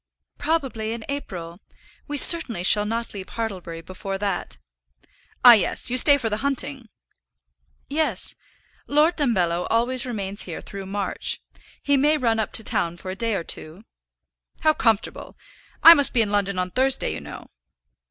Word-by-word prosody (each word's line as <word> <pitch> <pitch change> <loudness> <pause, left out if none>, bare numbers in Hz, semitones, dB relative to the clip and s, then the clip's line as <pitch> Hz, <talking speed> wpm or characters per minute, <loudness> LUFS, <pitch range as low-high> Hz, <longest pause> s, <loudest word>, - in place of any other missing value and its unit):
"Probably 260 -9 -2
in 230 -1 -8
April. 180 -11 -6 0.5
We 290 -1 -4
certainly 270 - +6
shall 210 +2 +3
not 230 +1 -4
leave 195 -2 -8
Hartlebury 185 -7 -6
before 185 +3 -6
that." 195 - -4 0.9
"Ah, 245 - +11
yes. 220 +2 0
You 255 - 0
stay 285 +2 +6
for 240 - -3
the 210 -1 -2
hunting." 275 -2 -3 1.0
"Yes; 285 -9 -2 0.5
Lord 305 +4 +2
Dumbello 180 - 0
always 245 +2 0
remains 205 -4 -3
here - - -7
through 195 -1 -9
March. 195 -1 -2 0.4
He 285 0 +2
may 300 +3 +2
run 230 -5 0
up 215 - -2
to 225 - +4
town 170 -4 -2
for 185 +2 -7
a - - -6
day 225 +1 -1
or 170 - -3
two." 165 +5 -7 0.8
"How 310 -1 +3
comfortable! 225 -7 -1 0.5
I 330 - +12
must 285 -4 +2
be 230 - +3
in 205 - -5
London 200 -2 0
on 180 0 -2
Thursday, 265 +5 +1
you - - -7
know." - - -11
225 Hz, 160 wpm, -23 LUFS, 195-270 Hz, 1.0 s, I